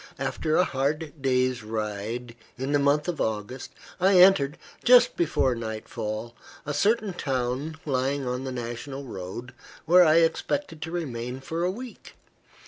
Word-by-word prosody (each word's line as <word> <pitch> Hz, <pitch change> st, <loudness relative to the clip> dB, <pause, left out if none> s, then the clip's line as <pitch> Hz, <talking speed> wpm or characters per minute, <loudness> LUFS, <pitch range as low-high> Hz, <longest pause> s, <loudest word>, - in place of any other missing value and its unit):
After 155 Hz, 0 st, -1 dB
a -, -, +5 dB
hard 150 Hz, 0 st, -2 dB
day's 130 Hz, -2 st, +1 dB
ride, 110 Hz, +2 st, -4 dB, 0.2 s
in 135 Hz, +3 st, -3 dB
the 145 Hz, -, +3 dB
month 145 Hz, +2 st, +2 dB
of 175 Hz, -3 st, -2 dB
August, 110 Hz, +4 st, -3 dB, 0.3 s
I 190 Hz, +1 st, +5 dB
entered, 180 Hz, -6 st, +6 dB, 0.3 s
just 250 Hz, 0 st, +6 dB
before 140 Hz, -6 st, +1 dB
nightfall, 110 Hz, 0 st, -5 dB, 0.3 s
a 145 Hz, -, -2 dB
certain 210 Hz, +4 st, +1 dB
town 135 Hz, +1 st, -2 dB
lying 135 Hz, 0 st, 0 dB
on 125 Hz, +1 st, -2 dB
the 130 Hz, -, -4 dB
National 125 Hz, +3 st, -5 dB
Road, 120 Hz, +2 st, -7 dB, 0.3 s
where 180 Hz, +3 st, +7 dB
I 155 Hz, -2 st, +5 dB
expected 165 Hz, -, +1 dB
to 160 Hz, -, -5 dB
remain 125 Hz, -7 st, -4 dB
for 165 Hz, +5 st, -3 dB
a 180 Hz, -, +2 dB
week. 240 Hz, +6 st, -8 dB
135 Hz, 145 wpm, -26 LUFS, 120-160 Hz, 0.3 s, where